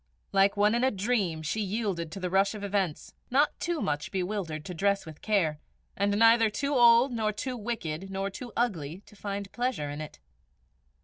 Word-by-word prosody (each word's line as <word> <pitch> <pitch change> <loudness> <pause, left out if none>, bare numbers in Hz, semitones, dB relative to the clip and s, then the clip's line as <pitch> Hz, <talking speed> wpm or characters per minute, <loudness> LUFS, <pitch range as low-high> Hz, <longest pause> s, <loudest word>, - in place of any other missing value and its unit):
Like 195 +1 +3
one 210 +1 +4
in 240 +1 +1
a 260 - +5
dream 195 -7 -1
she 215 +8 -1
yielded 195 -5 -2
to 195 - -6
the 180 -1 -3
rush 195 +2 +3
of 205 - -7
events, 195 -6 -2 0.2
not 280 +4 +3
too 345 -2 -1
much 145 0 -2
bewildered 180 -5 -3
to 180 - -5
dress 200 +3 +1
with 160 -2 -11
care, 170 -8 +1 0.4
and 200 +1 +1
neither 225 0 +6
too 280 +7 -2
old 240 0 +6
nor 220 -2 0
too 250 +5 -4
wicked 195 -7 -4
nor 195 +1 -3
too 240 +4 -8
ugly 185 -7 -1
to - - -17
find 200 -1 -5
pleasure 240 - -2
in 145 +1 -5
it. 155 - -8
200 Hz, 190 wpm, -28 LUFS, 180-230 Hz, 0.4 s, neither